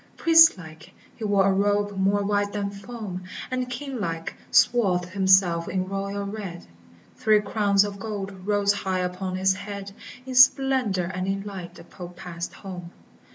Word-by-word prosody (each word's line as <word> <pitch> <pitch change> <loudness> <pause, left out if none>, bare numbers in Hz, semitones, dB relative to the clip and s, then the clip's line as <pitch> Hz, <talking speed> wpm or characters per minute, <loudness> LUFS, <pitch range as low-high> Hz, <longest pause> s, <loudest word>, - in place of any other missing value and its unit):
Priest 325 -6 +7
like, 160 +1 -13 0.2
he - - -9
wore 200 -2 +3
a - - +2
robe 205 +1 +1
more 195 +1 +1
white 205 0 0
than 200 -1 -2
foam, 200 -2 -7 0.3
And, 255 -1 -2
king 260 +1 -5
like, 165 -4 -4 0.2
swathed 190 -7 +3
himself 190 -3 +3
in 185 -1 -2
royal 200 +1 -4
red, 200 -4 -7 0.5
Three 215 -1 +4
crowns 205 -1 +2
of 200 -1 -6
gold 195 -2 -6
rose 205 -1 +2
high 190 -2 -2
upon 185 +1 -3
his 190 +1 +2
head: 200 0 -7 0.3
In 260 - -6
splendor 255 -6 +4
and 185 +1 -4
in 195 0 -2
light 190 -4 -8
the - - -12
Pope 180 -1 -11
passed 170 0 -6
home. 180 -3 -9
200 Hz, 160 wpm, -25 LUFS, 185-205 Hz, 0.5 s, Priest